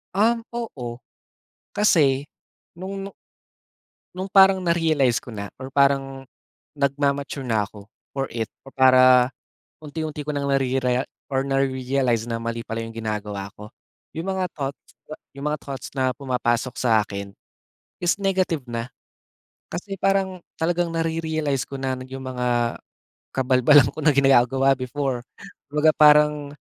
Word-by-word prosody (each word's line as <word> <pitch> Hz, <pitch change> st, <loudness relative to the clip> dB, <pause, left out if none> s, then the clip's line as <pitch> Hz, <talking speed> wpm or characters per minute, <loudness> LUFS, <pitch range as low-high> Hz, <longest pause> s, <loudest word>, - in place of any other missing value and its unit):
Um, 230 Hz, +3 st, +2 dB
oo. 125 Hz, -, -5 dB, 0.7 s
Kasi, 145 Hz, -9 st, +3 dB, 0.5 s
noong 195 Hz, +2 st, -6 dB
nu -, -, -12 dB, 1.0 s
noong 190 Hz, +1 st, -4 dB
parang 190 Hz, -1 st, +6 dB
na-realize 160 Hz, -8 st, +2 dB
ko 120 Hz, -, -11 dB
na, 100 Hz, -1 st, -6 dB
or 130 Hz, -, -6 dB
parang 135 Hz, -1 st, +2 dB, 0.5 s
nagma-mature 140 Hz, 0 st, -1 dB
na 110 Hz, -4 st, 0 dB
ako, 105 Hz, 0 st, -14 dB, 0.3 s
for 135 Hz, -1 st, 0 dB
it, 115 Hz, -2 st, -2 dB, 0.2 s
o 135 Hz, -, -13 dB
para 130 Hz, -1 st, +6 dB, 0.5 s
unti-unti 155 Hz, -1 st, -5 dB
ko 150 Hz, -, -2 dB
ng 140 Hz, 0 st, -2 dB
narerea 130 Hz, -2 st, +1 dB, 0.2 s
or 135 Hz, 0 st, 0 dB
na-realize 130 Hz, -3 st, 0 dB
na 115 Hz, -1 st, -3 dB
mali 115 Hz, 0 st, -4 dB
pala 115 Hz, 0 st, -3 dB
iyong 115 Hz, 0 st, -8 dB
ginagawa 105 Hz, -3 st, -4 dB
ko. 105 Hz, +1 st, -11 dB, 0.5 s
Iyong 165 Hz, +3 st, -4 dB
mga 190 Hz, -1 st, -1 dB
thoughts 140 Hz, -1 st, -4 dB, 0.6 s
iyong 140 Hz, +2 st, -5 dB
mga 150 Hz, -, -7 dB
thoughts 135 Hz, -2 st, -6 dB
na 130 Hz, -1 st, +2 dB
pumapasok 125 Hz, -3 st, -1 dB
sa 115 Hz, -3 st, +3 dB
akin, 100 Hz, -1 st, -7 dB, 0.7 s
is 175 Hz, -, +3 dB
negative 185 Hz, -6 st, +1 dB
na. 115 Hz, +1 st, -3 dB, 0.8 s
Kasi 195 Hz, +2 st, -5 dB
parang 195 Hz, -2 st, +1 dB, 0.2 s
talagang 175 Hz, +1 st, 0 dB
nare-realize 160 Hz, -4 st, -1 dB
ko 135 Hz, -, -6 dB
na 130 Hz, -1 st, -1 dB
iyong 130 Hz, +1 st, -8 dB
mga 125 Hz, -2 st, -1 dB, 0.6 s
kabalbalan 130 Hz, +1 st, +5 dB
ko -, -, -16 dB
na 150 Hz, -, +5 dB
ginagawa 135 Hz, 0 st, +4 dB
before. 130 Hz, 0 st, -2 dB, 0.5 s
Kumbaga 150 Hz, +2 st, +3 dB
parang, 150 Hz, -1 st, +5 dB
135 Hz, 135 wpm, -23 LUFS, 125-155 Hz, 1.0 s, parang